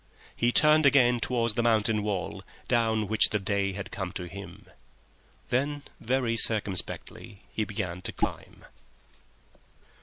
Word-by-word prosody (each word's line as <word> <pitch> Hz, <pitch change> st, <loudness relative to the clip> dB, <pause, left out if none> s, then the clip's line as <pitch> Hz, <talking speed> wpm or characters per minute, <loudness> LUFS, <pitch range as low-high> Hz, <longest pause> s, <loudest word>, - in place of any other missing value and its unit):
He 120 Hz, 0 st, +2 dB
turned 150 Hz, +2 st, +5 dB
again 125 Hz, -3 st, +4 dB
towards 115 Hz, -1 st, 0 dB
the 120 Hz, -, 0 dB
mountain 110 Hz, -2 st, +2 dB
wall 100 Hz, -3 st, -3 dB, 0.3 s
down 110 Hz, -3 st, +1 dB
which 110 Hz, +1 st, +4 dB
the 105 Hz, -, 0 dB
day 100 Hz, -1 st, -1 dB
had 100 Hz, +1 st, -7 dB
come 95 Hz, -3 st, -4 dB
to 90 Hz, -, -5 dB
him. 95 Hz, 0 st, -10 dB, 0.8 s
Then 145 Hz, +3 st, -1 dB, 0.2 s
very 125 Hz, -1 st, 0 dB
circumspectly 105 Hz, -2 st, 0 dB
he 110 Hz, -, -1 dB
began 90 Hz, -4 st, -4 dB
his -, -, -5 dB
climb. -, -, -4 dB
110 Hz, 130 wpm, -28 LUFS, 100-120 Hz, 0.8 s, turned